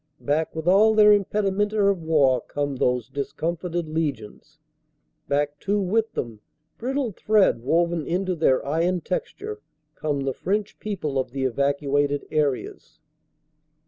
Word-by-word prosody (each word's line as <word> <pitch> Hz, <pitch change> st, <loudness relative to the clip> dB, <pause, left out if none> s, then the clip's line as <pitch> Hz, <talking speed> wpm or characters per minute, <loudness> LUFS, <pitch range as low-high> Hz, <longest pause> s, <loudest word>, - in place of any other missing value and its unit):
Back 155 Hz, +3 st, -1 dB
with 160 Hz, +1 st, -5 dB
all 215 Hz, +4 st, +5 dB
their 210 Hz, -1 st, +7 dB
impedimenta 205 Hz, +1 st, 0 dB
of 200 Hz, -3 st, +2 dB
war 140 Hz, -6 st, +3 dB
come 145 Hz, -2 st, -3 dB
those 125 Hz, -2 st, 0 dB
discomforted 165 Hz, +4 st, -3 dB
legions. 150 Hz, -2 st, -4 dB, 0.7 s
Back 145 Hz, +1 st, -1 dB
too 205 Hz, +1 st, 0 dB
with 215 Hz, +4 st, 0 dB
them, 115 Hz, -3 st, -4 dB, 0.4 s
brittle 260 Hz, 0 st, -1 dB
thread 205 Hz, -, +2 dB
woven 170 Hz, +4 st, +1 dB
into 185 Hz, +2 st, 0 dB
their 145 Hz, -5 st, +2 dB
iron 170 Hz, +5 st, 0 dB
texture, 430 Hz, -, -5 dB, 0.3 s
come 145 Hz, -2 st, -2 dB
the 135 Hz, -1 st, -1 dB
French 205 Hz, +6 st, -2 dB
people 165 Hz, -10 st, -3 dB
of 130 Hz, -, -2 dB
the 135 Hz, +2 st, -4 dB
evacuated 140 Hz, +2 st, 0 dB
areas. 145 Hz, -4 st, -2 dB
160 Hz, 130 wpm, -24 LUFS, 140-200 Hz, 0.7 s, their